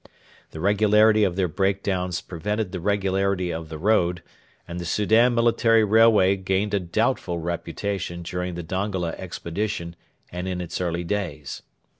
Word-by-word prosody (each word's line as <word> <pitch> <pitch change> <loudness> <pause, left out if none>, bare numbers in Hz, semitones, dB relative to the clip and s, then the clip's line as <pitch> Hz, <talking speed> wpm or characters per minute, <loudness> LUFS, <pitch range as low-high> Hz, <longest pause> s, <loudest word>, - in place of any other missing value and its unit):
The 80 - -9
regularity 105 +3 +4
of 95 -4 +1
their 95 -1 +1
break 95 +3 0
downs 90 -2 -1
prevented 105 +3 -3
the 90 - -4
regularity 95 -1 0
of 80 -1 -6
the 80 - -6
road, 90 -2 +1 0.4
and 85 +1 -6
the - - -4
Soudan 110 +6 +3
military 115 -1 +4
railway 105 -3 +5
gained 95 +2 -1
a 100 - +3
doubtful 85 0 -1
reputation 85 +2 -4
during 90 +1 -4
the 85 - -5
Dongola 95 0 -2
expedition 85 -1 -4 0.4
and 90 +1 -5
in 90 -1 -3
its 90 0 -4
early 85 -1 -1
days. 85 -7 -4
95 Hz, 150 wpm, -24 LUFS, 85-105 Hz, 0.4 s, railway